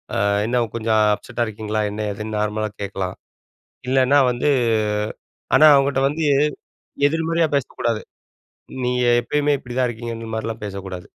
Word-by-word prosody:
அ - - 0 0.3
"என்ன 120 +1 +1
கொஞ்சம் 110 -1 +2
அப்செட்டா 120 +3 -3
இருக்கீங்களா?" 110 0 -3
என்னா, 105 +1 -3
ஏதுன்னு 105 +1 -5
நார்மலா 105 0 -1
கேட்கலாம். 95 -2 -4 0.7
இல்லன்னா, 135 +2 +4
வந்து 125 +4 0 1.1
ஆனா, 155 - +7
அவுங்ட்ட 135 -1 +2
வந்து, 155 +3 -2 0.8
எதிர்மறையா 165 +2 +1
பேசக்கூடாது. 115 -4 -2 0.8
நீய 125 0 +1 0.2
எப்பயுமே 145 0 +1
இப்படி 120 -2 -9
தான் 125 -1 +2
இருக்கீங்கங்க 115 0 -6
இந்த 115 - -7
மாரிலாம் 115 +1 -4
பேசக்கூடாது. 95 -3 -6
115 Hz, 130 wpm, -21 LUFS, 110-135 Hz, 1.1 s, ஆனா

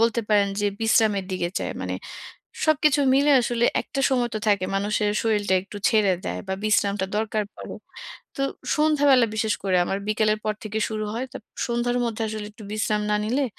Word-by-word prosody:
বলতে 230 0 +2
পারেন 205 -1 +3
যে 205 - +1
বিশ্রামের 220 -3 +3
দিকে 175 -2 -1
যায়। - - -3
মানে, - - -3 0.7
সবকিছু 300 -1 +3
মিলে 285 +2 +4
আসলে 240 0 0 0.2
একটা 275 - -4
সময় 245 -2 +1
তো - - 0
থাকে, 200 -3 +2
মানুষের 210 +1 0
শরীরটা 210 -4 +1
একটু 205 +1 -11
ছেড়ে 210 -4 +3
দেয় - - -3
বা 190 - 0
বিশ্রামটা 200 -2 +1
দরকার 215 -1 -1
পরে। - - -8 0.6
তো 275 - -1 0.3
সন্ধ্যাবেলা 290 -5 +4
বিশেষ 220 -1 0
করে 185 -2 +2
আমার 195 - -2
বিকেলের 215 0 +2
পর 215 - 0
থেকে 215 +1 -3
শুরু 215 -1 -3
হয়। 255 +3 -3
তারপর 220 - -11 0.2
সন্ধ্যার 240 +1 0
মধ্যে 230 -1 -3
আসলে 215 -1 -5
একটু 215 -1 -13
বিশ্রাম 215 0 0
না 210 - +3
নিলে, 255 +6 0
215 Hz, 180 wpm, -24 LUFS, 210-240 Hz, 0.7 s, মিলে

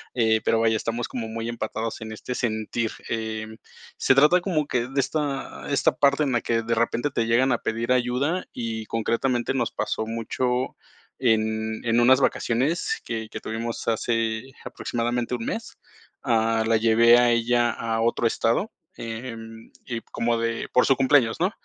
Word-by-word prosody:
Eh, 110 -2 +3
pero, 115 - +2
vaya, 115 0 +3
estamos 115 +2 -2
como 115 -3 -5
muy 115 +1 -5
empatados 115 -1 -4
en 110 0 -6
este 110 +3 -5
sentir. 110 -1 -2 0.2
Eh, 110 -1 -3 0.5
se 135 - +3
trata 150 +7 +5
como 170 -5 0
que 120 -3 -1
de 135 +2 -2
esta 140 0 -2
esta 140 - +2
parte 140 +1 +3
en 140 - 0
la 120 -2 +1
que 115 -1 0
de 115 +1 -1
repente 115 +4 0
te 115 -4 -1
llegan 125 +3 +3
a 120 - +1
pedir 115 +2 -2
ayuda 125 +8 +1
y, 110 -2 -4
concretamente, 120 +2 0
nos 120 -3 -1
pasó 110 - -2
mucho 125 +3 -2 0.5
en 110 -2 0
en 115 0 +2
unas 130 +3 +5
vacaciones 145 - 0
que 110 -2 -4
que - - -7
tuvimos 115 +1 -4
hace 115 +2 -1
aproximadamente 120 +1 -2
un 115 - -5
mes. 225 - -5 0.5
Ah, 115 -1 +2
la 115 0 +3
llevé 115 +1 +6
a 120 0 +4
ella 120 0 +2
a 115 0 -2
otro 115 +1 +1
estado, 115 - +1 0.2
eh, 115 +2 -6
en 115 0 -11 0.2
y 115 -2 -3
como 115 0 +1
de 115 0 -2
por 125 - +4
su 135 - +4
cumpleaños, 130 -3 +3
¿no? 185 +3 +2
115 Hz, 170 wpm, -24 LUFS, 115-125 Hz, 0.5 s, llevé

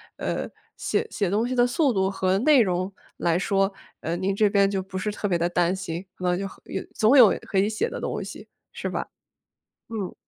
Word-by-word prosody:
呃， - - -3 0.3
写 - - 0
写 200 -4 0
东 210 +5 +1
西 250 - -2
的 245 -1 +4
速 275 +3 +2
度 190 -3 +1
和 190 -1 +1
内 280 +1 +6
容 185 -2 0 0.3
来 170 0 +1
说， 195 0 +1 0.3
呃， 165 - -2
您 190 +2 0
这 205 +1 +3
边 200 -1 +3
就 195 -1 -1
不 190 0 -7
是 210 +3 -1
特 205 - -3
别 175 -3 +1
地 170 +1 0
担 175 +1 +1
心， 175 -1 -5
可 185 - -11
能 180 0 +1
就 195 - -2
和 - - -15
有 190 - -3
总 225 +6 +5
有 235 -6 +7
可 195 - -1
以 200 - +3
写 220 - -1
的 485 - -5
东 - - -3
西， - - -9 0.2
是 - - -5
吧？ - - -3 0.8
嗯。 215 -5 -4
195 Hz, 240 characters per minute, -25 LUFS, 185-215 Hz, 0.8 s, 有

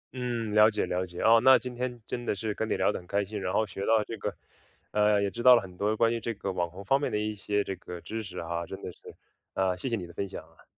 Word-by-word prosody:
嗯， 120 -4 -2
了 105 +1 +7
解， 110 - -1
了 90 +1 -1
解， 85 0 -9
啊， 115 +1 +7
那 130 0 +8
今 125 -1 -6
天 125 0 -4
真 120 - -4
的 120 - -1
是 110 +1 -3
跟 110 +2 -3
你 - - +1
聊 - - +3
得 - - -4
很 90 - -16
开 100 +1 0
心， 105 +1 -5
然 90 - -2
后 110 - +2
学 95 -1 -8
到 110 +1 +3
这 115 - -6
个 - - -2 0.6
呃， 105 0 +3
也 100 - 0
知 120 - -6
道 125 0 +9
了 - - +3
很 90 -2 -11
多 105 +3 0
关 115 +1 +3
于 115 - -1
这 115 0 -3
个 100 -1 -3
网 90 -2 -1
红 95 +4 -10
方 135 +6 +3
面 - - -1
的 - - 0
一 105 0 -1
些 105 0 -1
这 95 - -4
个 90 -1 -8
知 110 +6 -5
识 95 -4 -9
啊， 85 0 -3
真 95 - -7
的 - - -5
是， - - -21 0.6
呃， 95 -1 +1
谢 110 +9 -4
谢 115 - +1
你 95 -5 -5
的 85 - -13
分 100 +2 -3
享 - - -7
啊。 - - -22
105 Hz, 330 characters per minute, -28 LUFS, 95-115 Hz, 0.6 s, 道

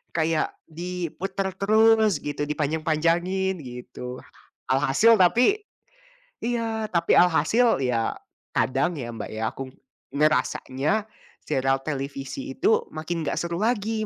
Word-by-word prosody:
Kayak, 160 -1 0
diputer 180 +3 -4
terus, 220 -1 +4
gitu, 145 0 -4
dipanjang-panjangin, 165 +5 0
gitu. 125 -1 -8 0.5
Alhasil 145 +12 +5
tapi 245 - +4 0.8
iya, 225 -2 -1
tapi 170 -1 +2
alhasil, 180 - +3
ya, 120 -3 0 0.4
kadang 140 +7 +1
ya 120 -2 -5
Mbak 115 -2 -6
ya, 110 0 -2
aku 135 - -6
ng 130 - -21 0.4
ngerasanya, 150 +5 +1 0.4
serial 135 -2 +1
televisi 140 - -4
itu, 450 +5 +2
makin 160 +1 -3
enggak - - 0
seru 170 0 -3
lagi, 220 -1 0
165 Hz, 110 wpm, -25 LUFS, 140-215 Hz, 0.8 s, Alhasil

